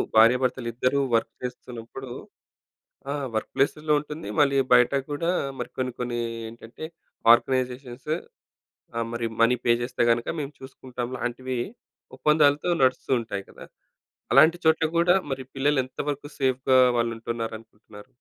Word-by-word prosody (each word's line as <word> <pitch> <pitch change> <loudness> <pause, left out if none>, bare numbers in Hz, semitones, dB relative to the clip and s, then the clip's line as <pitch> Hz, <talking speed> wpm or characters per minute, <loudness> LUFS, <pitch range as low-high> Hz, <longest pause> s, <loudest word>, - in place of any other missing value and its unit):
భార్యాభర్తలిద్దరూ 125 +2 +3 0.2
వర్క్ 115 0 0
చేస్తున్నప్పుడు 125 +1 -7 1.0
ఆ! - - 0 0.2
వర్క్ 110 - -2
ప్లేసు‌ల్లో 150 +2 +1
ఉంటుంది. 150 +2 -8
మళ్ళీ 140 -1 +4 0.2
బయట 125 +2 +5 0.2
కూడా 165 +4 -1 0.3
మరి - - -4
కొన్ని 130 -1 -2
కొన్ని 120 -1 -2 0.3
ఏంటంటే 115 +6 -10 0.5
ఆర్గనైజేషన్స్ 130 +2 -1 0.9
ఆ! - - 0
మరి 115 0 -2
మనీ 115 +2 +5
పే 120 - +5
చేస్తే 120 0 -1
గనక 115 0 +1
మేము 140 0 -5
చూసుకుంటాంలాంటివి 130 -1 -5 0.6
ఒప్పందాలతో 150 +2 +3
నడుస్తూతుంటాయి 120 -6 0
కదా! - - -12 0.7
అలాంటి 165 +2 +7
చోట్ల 160 0 +4
కూడా 175 +2 +5 0.2
మరి 130 0 -3
పిల్లలు 140 0 +2
ఎంతవరకు 145 +2 -5
సేఫ్‌గా 130 -1 +3 0.2
వాళ్ళు 115 0 +1
ఉంటున్నారనుకుంటున్నారు? 115 -2 -7
130 Hz, 115 wpm, -25 LUFS, 120-140 Hz, 1.0 s, అలాంటి